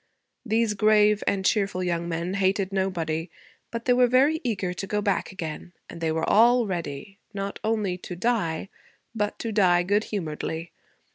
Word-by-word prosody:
These 225 -2 +1
grave 210 0 +4
and 190 -1 0
cheerful 195 -3 +1
young 170 -1 -1
men 170 +2 -2
hated 195 0 0
nobody; 170 -4 -1 0.4
but 230 0 -5
they 250 - +4
were 250 0 +5
very 275 +6 +3
eager 200 -7 -1
to 195 +2 -5
go 210 - 0
back 200 -1 -1
again; 175 -1 -6 0.2
and 170 - -10
they 160 -1 0
were 160 0 -1
all 240 +3 +5
ready, 175 0 -5 0.2
not 195 0 -4
only 210 -5 -1
to 180 - -7
die 190 -4 -1 0.4
but 210 -2 -2
to 230 - -4
die 180 -4 +4
good 205 +4 +1
humoredly. 165 -3 -4
195 Hz, 165 wpm, -25 LUFS, 175-215 Hz, 0.4 s, were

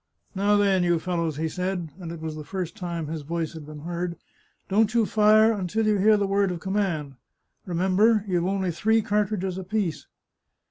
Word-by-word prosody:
" - - -51
Now, 205 +2 +3
then, 195 -2 +3
you 175 -1 +2
fellows," 165 -3 -2
he 160 +1 -1
said, 180 -1 -3
and 170 -3 -6
it 170 -2 -8
was 160 -1 -4
the 155 - -7
first 185 +2 -5
time 170 -5 -4
his 155 +1 -5
voice 165 +2 -3
had 160 -3 -9
been 150 -1 -9
heard, 170 +1 -3 0.3
" - - -41
don't 210 +2 +2
you 230 -2 +4
fire 215 +1 +5
until 210 +2 -1
you 215 -1 +3
hear 215 +2 +5
the 205 - +1
word 195 0 +1
of 175 -2 -4
command. 175 -8 -2 0.5
Remember, 190 +5 +2
you've 175 -2 0
only 190 -2 0
three 220 +6 +2
cartridges 200 -3 -1
apiece." 190 -4 -2
185 Hz, 195 wpm, -25 LUFS, 170-205 Hz, 0.5 s, fire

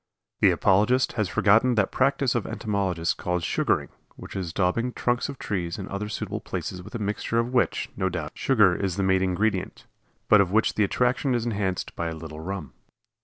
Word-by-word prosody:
The - - +6
apologist 105 +7 +3
has 110 -5 -1
forgotten 115 +5 +4
that 105 -3 +1
practice 135 -1 +2
of 120 - -1
entomologists 95 -6 -1
called 90 -1 -2
"sugaring," - - 0 0.3
which - - -10
is 90 -4 -3
daubing 110 +8 0
trunks 120 +2 0
of 140 - -6
trees 90 -7 -3
and 95 - -6
other 100 +2 -4
suitable - - -4
places 90 - -5
with 90 - -10
a - - 0
mixture 105 +2 -2
of 120 +2 0
which, 125 - +1
no 95 - 0
doubt, 85 -4 -4
sugar 105 -9 +3
is 95 -2 -2
the 100 - -1
main 95 0 +3
ingredient, 95 +1 -1 0.4
but 105 -2 +7
of 90 -2 0
which 110 +2 +2
the 110 - +2
attraction 125 +5 +1
is 120 -1 -1
enhanced 100 -5 -2
by 85 - -2
a 80 - -4
little 80 -1 -8
rum. 90 -2 -6
100 Hz, 195 wpm, -25 LUFS, 90-115 Hz, 0.4 s, but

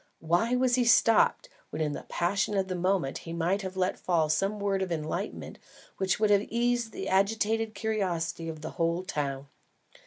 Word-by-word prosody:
Why 175 +10 +1
was 250 0 +2
he 250 0 +4
stopped, 230 -1 +4 0.2
when 155 - -6
in 155 -2 0
the - - -7
passion 200 +3 0
of 190 -1 0
the - - -1
moment, 180 -5 0
he 165 - -8
might 175 +4 0
have 190 -1 -6
let 185 0 0
fall 165 -4 +1
some 195 +7 0
word 200 -1 0
of 185 -2 -2
enlightenment 165 +5 -4 0.4
which 190 0 0
would 215 -1 +3
have 205 0 +3
eased 240 0 0
the - - -5
agitated 220 +3 +1
curiosity 175 -7 -2
of 155 -1 -7
the - - -6
whole 170 +2 +1
town! 140 -6 -3
190 Hz, 185 wpm, -28 LUFS, 165-215 Hz, 0.4 s, he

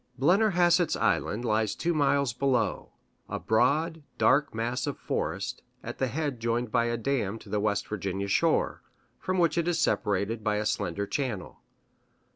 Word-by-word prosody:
Blennerhassett's 175 +1 +3
Island 115 +4 0
lies 110 -2 +1
two 170 0 0
miles 140 -4 +2
below 125 -4 0 0.4
a - - -2
broad, 155 +9 +1 0.2
dark 145 +3 +3
mass 120 +4 -2
of 145 - -3
forest, - - -3 0.2
at - - -7
the 130 - +1
head 140 -1 -3
joined 115 0 -1
by 115 - +2
a 120 0 -1
dam 115 -4 -1
to - - -14
the 105 - 0
West 100 -1 0
Virginia 100 -1 -3
shore, 100 - +1 0.4
from 185 0 -2
which 170 -1 +2
it 170 - -1
is 175 -1 +1
separated 105 -1 0
by 105 -1 +1
a 105 +1 -1
slender 100 0 -1
channel. 115 -6 -4
120 Hz, 160 wpm, -28 LUFS, 105-150 Hz, 0.4 s, Blennerhassett's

